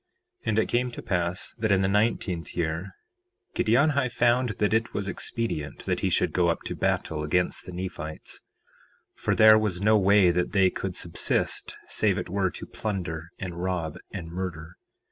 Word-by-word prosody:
4:5 - - -11
And 110 -1 +1
it 110 - +4
came 125 +1 0
to 120 - -8
pass 90 0 -1
that 110 -1 +1
in 95 -1 +4
the - - +2
nineteenth 100 -4 0
year 85 +2 -2 0.6
Giddianhi 140 +3 +3
found 120 +1 +2
that 105 0 +1
it 115 +1 0
was 100 -1 -2
expedient 90 -7 -4
that - - 0
he - - 0
should - - +1
go 90 -1 +3
up 85 - 0
to - - -4
battle 75 -1 -1
against 90 +4 0
the - - -6
Nephites, 90 -4 -6 0.7
for - - -1
there 110 0 +8
was 105 -5 -1
no 105 +2 +4
way 100 -2 +5
that 90 +3 -1
they 95 -2 +4
could 95 -2 -4
subsist 85 -1 -1
save - - +2
it - - -4
were 95 0 +1
to - - -8
plunder 85 -6 -4
and 85 -2 -5
rob 90 -3 -2
and 85 -5 -6
murder. 85 -2 -5
95 Hz, 180 wpm, -26 LUFS, 85-110 Hz, 0.7 s, there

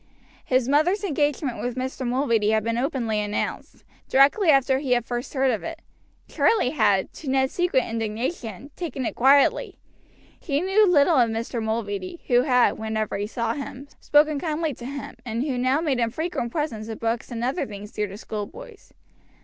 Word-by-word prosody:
His 255 -1 +1
mother's 310 +9 +2
engagement 290 - -1
with 245 0 -3
Mr. 260 0 -3
Mulready 235 -4 +1
had 220 -1 +2
been 230 +1 -1
openly 240 -4 -1
announced, 210 0 -4 0.3
directly 285 +8 +4
after 270 -2 +4
he 270 -3 +1
had 240 -1 +1
first 240 +4 -5
heard 265 -1 +3
of 220 - -2
it. 330 0 -7 0.4
Charlie 385 - +2
had, 210 -9 +2
to 295 - -7
Ned's 265 0 +1
secret 350 -8 +2
indignation, 225 - -4
taken 275 -7 -4
it - - -2
quietly. 275 +3 +3 0.6
He 285 -4 -1
knew 385 +4 +3
little 315 -1 +4
of 240 -2 +4
Mr. 230 +1 -3
Mulready, 220 - -3
who 245 -2 +4
had, 250 -2 +3
whenever 220 -1 -2
he 205 +1 -2
saw 230 0 -2
him, 275 0 -7
spoken 295 0 +3
kindly 315 0 -2
to 240 - -10
him, 280 0 -7
and 235 0 -2
who 280 -3 -2
now 255 +4 +1
made 285 -6 0
him 230 -1 +1
frequent 315 -3 -3
presents 235 -9 -3
of 220 -1 -6
books 230 +1 -2
and 235 -2 -4
other 255 +3 -1
things 205 0 -9
dear 210 -1 -2
to 195 +1 -9
schoolboys. 405 - -8
255 Hz, 180 wpm, -24 LUFS, 225-290 Hz, 0.6 s, directly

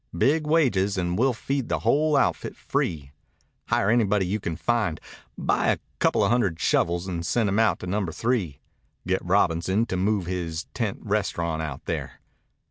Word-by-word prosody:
Big 150 - +2
wages 105 -12 +2
and 90 -1 -1
we'll 130 +2 +4
feed 135 +2 -3
the - - -1
whole 150 0 +3
outfit - - 0
free. 70 -5 -2 0.6
Hire 100 - +2
anybody 105 -4 +2
you 100 +4 -1
can 85 -4 -3
find. 110 -3 0 0.4
Buy - - +1
a - - +3 0.2
coupla - - +3
hundred 100 -9 +1
shovels 85 +2 +1
and 85 -3 -3
send 105 +7 +1
'em 100 +2 +1
out 110 -1 +3
to - - -5
Number 95 -1 -1
Three. 105 - -1 0.4
Get 95 +1 0
Robinson 95 +3 +2
to 95 - -3
move 100 0 +1
his 85 -2 -3
tent 110 -5 -2
restaurant 85 -6 -1
out 75 -4 -6
there." - - -4
95 Hz, 165 wpm, -25 LUFS, 85-115 Hz, 0.6 s, we'll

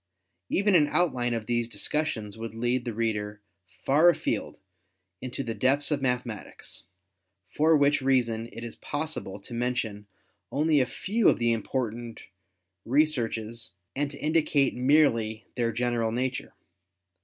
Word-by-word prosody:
Even 200 +1 +2
an 155 -5 +5
outline 125 -8 +1
of 115 -1 -4
these 120 0 0
discussions 110 -1 -2
would 115 0 -7
lead 120 +2 0
the 120 - -2
reader 105 -2 -2 0.4
far 155 +6 +5
afield 175 - -1 0.6
into 130 +2 -4
the 115 - -3
depths 140 +5 +1
of 145 -2 0
mathematics, 125 -4 -4 0.7
for 155 +1 +4
which 145 0 +3
reason 120 -4 +1
it 115 - -8
is 115 - -7
possible 145 -10 -4
to 110 +5 -10
mention 115 -4 -2 0.4
only 150 +1 +3
a 130 - +2
few 220 +2 +2
of - - +2
the 120 0 +2
important 115 0 -3 0.6
researches 115 - 0 0.2
and 145 +1 0
to 140 - -8
indicate 150 -3 +2
merely 115 -6 +2
their 120 -2 0
general 120 -1 0
nature. 125 +2 -2
125 Hz, 135 wpm, -27 LUFS, 115-145 Hz, 0.7 s, an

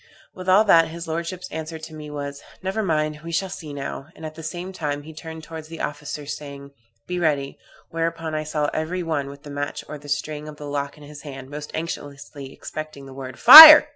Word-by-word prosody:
With 185 0 -6
all 195 +3 +6
that, 165 -6 +5
his 170 +1 -8
lordship's 170 +3 -5
answer 160 +1 -6
to 160 0 -11
me 150 -1 -9
was, 140 -1 -6 0.2
'Never 190 +4 -2
mind, 155 -5 -1
we 170 - -7
shall 190 +3 -1
see 160 -5 -8
now;' 140 0 -6
and 160 - -10
at 155 - -7
the 160 - -11
same 175 +4 -6
time 145 -4 -4
he 160 +2 -11
turned 160 0 -9
towards 160 0 -9
the 165 0 -10
officers, 150 0 -5
saying, 140 -1 -11 0.3
'Be 180 0 -4
ready,' 145 -5 -1 0.3
whereupon 165 -1 -3
I 155 0 -2
saw 150 -1 -2
every 175 +3 -3
one 150 -4 -2
with 140 +1 -13
the 145 - -10
match 145 0 -5
or 150 - -8
the 145 0 -13
string 150 +1 -3
of 150 - -9
the 150 - -9
lock 145 0 -4
in 150 - -15
his 145 0 -12
hand, 135 -2 -10
most 150 +1 -7
anxiously 145 -3 -7
expecting 155 -1 -8
the 135 - -12
word 130 -1 -9
'Fire'! 300 +3 +12
155 Hz, 220 wpm, -22 LUFS, 145-165 Hz, 0.3 s, Fire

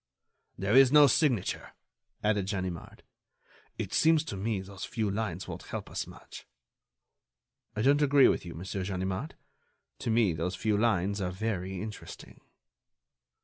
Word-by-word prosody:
_" - - -62 0.5
"There 100 +5 0
is 135 -1 +7
no 150 0 +8
signature," 135 - +1 0.5
added 105 -2 +1
Ganimard. 95 -4 -5 0.7
"It - - -4
seems 160 -1 +4
to 150 -10 -6
me 105 +1 -2
those 95 0 -9
few 110 -3 -2
lines 95 -4 -3
won't - - -8
help - - -6
us - - -3
much." - - -12 1.3
"I 110 - -1
don't 140 +3 +4
agree 145 -2 +6
with - - +1
you, 85 -2 -8
Monsieur 95 +3 -4
Ganimard. 95 - -3 0.6
To - - -3
me 110 -5 +3
those 85 +4 -3
few 110 -1 0
lines 100 -2 +1
are 90 - -1
very 95 -1 -3
interesting." 105 +1 -9
100 Hz, 145 wpm, -29 LUFS, 95-115 Hz, 1.3 s, no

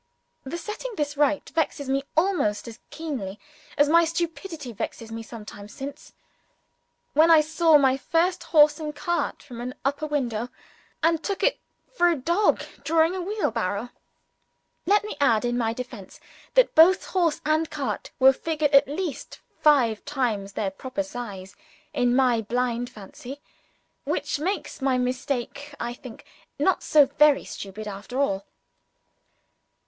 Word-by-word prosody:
The 270 +6 -5
setting 435 +7 -6
this 295 -1 -2
right 290 0 +1
still - - -14
vexes 310 -3 -1
me 270 +1 +1 0.2
almost 320 - +1
as 230 - -9
keenly 255 -12 -5 0.4
as 290 - +5
my 335 +3 +5
stupidity 330 -3 -4
vexed 225 +2 -6
me 225 0 -5
some 225 -1 -10
time 205 -1 -10
since, 275 +7 -9 1.0
when 315 +3 +5
I 325 -2 +8
saw 320 0 +4
my 265 -2 +3
first 335 +6 0
horse 300 -1 +5
and 300 -1 -5
cart 315 +1 -2
from 240 -4 -9
an 250 +1 -5
upper 285 +2 -1
window, 245 -6 -2 0.5
and 330 -1 +2
took 395 -2 -3
it - - +2 0.3
for 350 -8 +4
a 340 - +2
dog 340 +9 +1 0.2
drawing 325 +1 +3
a 375 - -3
wheelbarrow! 235 - -2 1.0
Let 415 +2 +4
me 425 - -6
add 230 -4 +3
in 240 0 0
my 235 -2 0
own 225 - -3
defence 240 -6 -8 0.4
that - - +5
both 355 +4 +6
horse 345 -5 +1
and 310 +1 +1
cart 265 -9 -4
were 265 0 +7
figured 310 0 -1
at 280 0 +6
least 315 +2 -5 0.2
five 250 -8 +4
times 235 -9 -2
their 195 -2 -2
proper 260 +8 -4
size 220 -9 -8 0.4
in 245 -3 +2
my 250 -3 +3
blind 245 +2 -1
fancy, 245 +5 -10 0.7
which - - -2
makes 370 -1 -3
my 265 -1 +2
mistake, 255 +3 -3
I 240 0 -3
think, 240 -1 -12 0.3
not 360 +6 +2
so 295 -2 +5
very 285 +1 +3
stupid 205 +2 -7
after 205 +6 -6
all. 195 -8 0
280 Hz, 155 wpm, -25 LUFS, 240-320 Hz, 1.0 s, I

